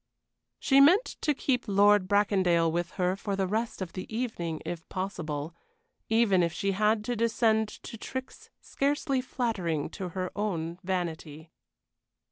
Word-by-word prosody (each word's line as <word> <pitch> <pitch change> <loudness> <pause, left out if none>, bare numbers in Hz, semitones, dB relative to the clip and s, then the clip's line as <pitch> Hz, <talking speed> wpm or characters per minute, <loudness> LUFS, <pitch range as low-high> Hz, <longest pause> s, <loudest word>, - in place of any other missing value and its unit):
She 275 -2 +4
meant 360 - +6 0.2
to 300 -2 +1
keep 250 -3 -1
Lord 205 -1 +4
Bracondale 185 -5 +3
with 175 +1 -1
her 180 0 0
for 200 0 -3
the 195 -1 0
rest 215 +1 -2
of 175 - -9
the 185 - -7
evening 215 -9 -3
if 170 -1 -6
possible, 165 -5 -4 0.6
even 220 -5 +4
if 170 -1 +1
she 195 +4 -1
had 210 +2 +2
to 245 - -1
descend 225 -1 +2 0.2
to 225 - -8
tricks 260 +2 -7
scarcely 275 -1 -1
flattering 185 - -2
to 190 -3 -5
her 185 -1 -2
own 175 -5 -2
vanity. 165 -4 -4
195 Hz, 145 wpm, -28 LUFS, 175-225 Hz, 0.6 s, meant